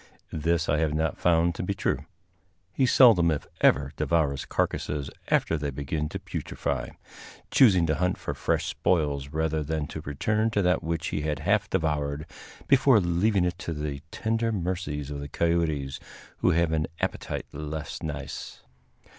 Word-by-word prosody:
This 80 +1 0
I 75 - +2
have 75 -1 +1
not 80 0 -1
found 85 0 +3
to - - -5
be 100 +2 -2
true. - - -1 0.7
He 130 +6 +2
seldom 110 -11 +6
if 75 -3 -1
ever 70 0 +4
devours 75 -5 +1
carcasses 75 -2 -2 0.2
after 80 - +2
they 75 0 -2
begin 70 +3 -3
to - - -4
putrify, 65 -3 -3 0.6
choosing 95 -10 +6
to 80 - +1
hunt 90 +2 0
for - - -4
fresh - - 0
spoils 75 -5 0
rather 80 +1 -1
than 75 0 -2
to 80 - -6
return 105 +10 0
to 105 -3 +1
that 90 0 +2
which 80 0 -2
he - - -2
had 75 -1 -1
half 100 +9 +1
devoured, 75 -4 -1 0.4
before 135 -3 +6
leaving 90 +2 +2
it 90 0 -2
to 85 - -4
the 75 -2 -4
tender 115 +4 -1
mercies 85 -7 -3
of 70 - -4
the 70 0 -6
coyotes, 80 -4 0 0.4
who - - +3
have 85 0 +2
an 80 -1 0
appetite - - -3
less 75 +1 -5
nice. 75 -3 -6
80 Hz, 165 wpm, -27 LUFS, 75-90 Hz, 0.7 s, seldom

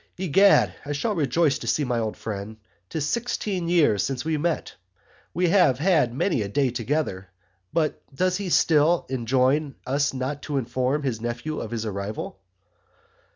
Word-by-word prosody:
Egad 190 +3 +4
I 145 - -4
shall 210 +10 -1
rejoice 150 -3 +1
to - - -7
see 150 - +1
my 125 -3 0
old 110 -2 -3
Friend 105 0 -6 0.3
'Tis 155 -2 -2
sixteen 205 -5 -2
years 150 - +3
since 130 +2 -2
we 160 0 0
met 160 +2 -1 0.6
We 180 0 +1
have 175 - +4
had 155 -6 +3
many 135 - 0
a 100 - -2
Day 135 +4 +1
together 115 -6 -2 0.4
but 155 -1 0
does 180 +6 0
he 200 -2 -4
still 165 0 +3
enjoin 130 +3 +1
us 140 +2 +1
not 135 +2 -4
to 145 -1 -3
inform 130 +3 -1
his 120 -5 -2
Nephews 120 +6 -3
of - - -6
his 115 -1 -3
Arrival? 100 -1 -5
140 Hz, 160 wpm, -25 LUFS, 120-165 Hz, 0.6 s, Egad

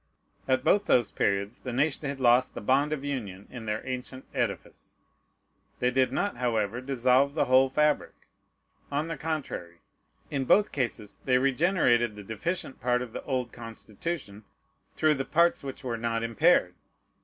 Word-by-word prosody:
At 130 -1 +2
both 205 0 +3
those 120 -4 +3
periods 100 +4 -1
the 125 - -6
nation 140 +3 0
had 140 -1 -5
lost 125 0 +4
the - - -4
bond 135 +7 +2
of 145 -2 -3
union 105 -9 -5
in 115 -3 -8
their 105 +1 -2
ancient 130 0 -6
edifice: 120 -7 -4 0.8
they 125 0 +1
did 130 0 +2
not, 205 0 -1
however, 115 -1 -1
dissolve 130 +1 +2
the - - +2
whole 130 +1 +5
fabric. 150 +2 +1 0.7
On 150 +3 -1
the 165 - -3
contrary, 140 - -4 0.5
in 135 -2 -1
both 205 +10 +4
cases 115 -6 -3
they 125 -1 +4
regenerated 130 - +2
the 105 - -9
deficient 130 - -4
part 125 +1 +1
of 120 -3 -10
the - - -5
old 125 -3 -2
Constitution 115 +1 -6 0.5
through 155 -1 +3
the 135 -2 -2
parts 170 +4 +2
which 135 0 -7
were 120 -3 -2
not 115 0 -1
impaired. 115 -2 +3
130 Hz, 160 wpm, -28 LUFS, 115-140 Hz, 0.8 s, whole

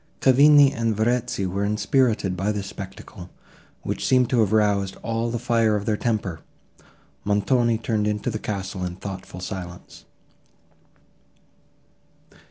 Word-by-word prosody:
Cavigni 140 +1 +6
and 115 -2 -1
Verezzi 115 -3 0
were 95 +2 -2
inspirited 105 -1 +1
by 95 +4 -1
this 105 -2 -4
spectacle, 95 -1 -9 0.5
which - - -3
seemed 125 -2 +3
to 125 - +2
have 105 -3 +2
roused 100 -3 +1
all 115 +1 -1
the 120 - -2
fire 115 -2 +2
of 105 -1 -3
their 110 - +1
temper; 105 -7 -2 0.8
Montoni 115 +3 +2
turned 110 -1 -1
into 105 +3 -1
the 110 - -4
castle 95 -3 -4
in 90 -1 -4
thoughtful 95 -1 -8
silence. 90 -2 -8
105 Hz, 130 wpm, -23 LUFS, 95-115 Hz, 0.8 s, Cavigni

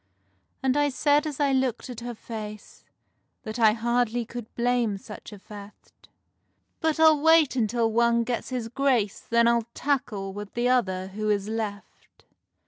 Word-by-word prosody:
And 260 0 +2
I 290 0 +3
said 290 +3 +2
as 295 -2 -5
I 285 -1 +2
looked 260 -3 0
at 245 -3 -7
her 240 0 -6
face 215 -2 -9 0.6
That 220 +2 -6
I 220 -2 +6
hardly 235 +1 0
could 235 -1 -8
blame 240 -3 +1
such 210 +3 -11
a 210 - -9
theft, 205 +1 -14 0.7
"But 320 -1 0
I'll 315 -2 +6
wait 320 -3 +5
until 230 -1 +1
one 235 +1 +3
gets 235 0 -3
his 250 -3 -3
grace, 245 -5 0
Then 235 0 +2
I'll 235 -1 +2
tackle 215 -9 -2
with 205 0 -8
the 240 +1 +1
other 190 -7 +1
who 215 +2 -3
is 205 -1 0
left." 215 -3 -6
235 Hz, 160 wpm, -26 LUFS, 215-260 Hz, 0.7 s, I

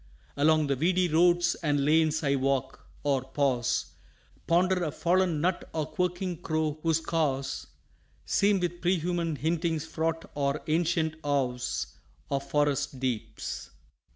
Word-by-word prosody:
Along 155 +2 +4
the 140 -1 +1
weedy 180 +6 +2
roads 175 +1 +4
and 145 -3 +1
lanes 155 +1 +3
I 140 -1 +2
walk 135 0 -1 0.2
or 140 -2 +2
pause 130 -2 0 0.6
Ponder 180 +2 +3
a 160 - 0
fallen 175 -1 +1
nut 180 +2 -1
or 155 -2 -1
quirking 180 0 -2
crow 155 -2 -1
whose 165 -1 +2
caws 140 -5 -1 0.6
Seem 200 -1 +3
with 175 -1 -3
prehuman 175 -2 0
hintings 160 0 -1
fraught 165 0 -2
or 140 0 -1
ancient 160 0 +1
awes 130 -4 -1 0.5
Of 140 0 -2
forest 145 -2 0
deeps. 125 -4 -4
155 Hz, 125 wpm, -28 LUFS, 140-175 Hz, 0.6 s, Along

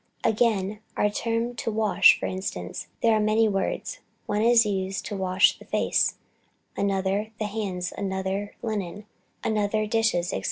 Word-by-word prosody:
Again, 210 -3 +1 0.2
for - - 0
our 210 - +4
term 230 +3 -1
to - - -2
wash, 210 -2 +5
for - - -3
instance, 90 - -4 0.2
there 230 -1 +5
are 215 - +3
many 215 +1 +3
words; 200 - -2 0.3
one 210 0 0
is 230 0 +5
used 195 -1 -2
for - - -5
to 200 -2 -4
wash 185 +1 +3
the - - -14
face, - - +1 0.6
another, 195 +1 0
the 215 - -2
hands, 195 -4 -3
another, 195 +1 -3
linen, 205 -3 -4 0.4
another, 215 0 0
dishes, 215 -5 +1
&c. - - -2
205 Hz, 160 wpm, -26 LUFS, 190-220 Hz, 0.6 s, wash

